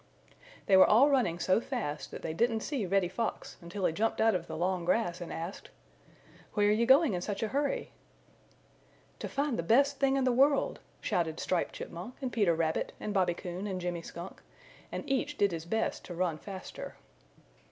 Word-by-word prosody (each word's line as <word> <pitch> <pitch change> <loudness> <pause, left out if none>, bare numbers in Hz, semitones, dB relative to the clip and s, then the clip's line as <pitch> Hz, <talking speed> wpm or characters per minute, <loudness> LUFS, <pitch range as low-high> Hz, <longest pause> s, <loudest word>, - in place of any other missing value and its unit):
They 195 - +5
were 190 - +8
all 265 +7 +6
running 235 -12 +2
so 185 +5 +2
fast 225 - -4
that - - -9
they 160 - -3
didn't 225 +5 +1
see 255 -8 -2
Reddy 195 0 +2
Fox 220 +6 -4
until 180 +3 -4
he - - +2
jumped 225 +6 0
out 225 0 +4
of 175 -2 -2
the - - -5
long 180 +1 0
grass 175 -1 0
and 175 - -6
asked: 170 +4 -6 0.9
"Where 205 -1 +4
are - - +5
you 230 +2 +2
going 270 -1 +6
in 175 - -2
such 200 +3 -3
a 220 - -1
hurry?" 295 - -1 1.3
"To - - -4
find 280 -5 -1
the - - +2
Best 275 +10 +3
Thing 275 -1 +3
in 270 - +1
the 255 - +3
World!" 275 +3 +3 0.2
shouted 165 -2 -1
Striped 180 -2 -1
Chipmunk 180 +9 -7
and 260 -3 -4
Peter 200 -7 +3
Rabbit 160 -1 -1
and 210 - -3
Bobby 180 -3 +2
Coon 180 +3 -5
and 190 -2 -3
Jimmy 175 -1 -3
Skunk, 170 +2 -9 0.5
and - - -5
each 275 +2 -1
did 200 -1 +3
his 165 -1 -5
best 220 +6 -1
to 175 - -7
run 170 -3 -1
faster. 190 +1 -8
200 Hz, 195 wpm, -31 LUFS, 175-245 Hz, 1.3 s, were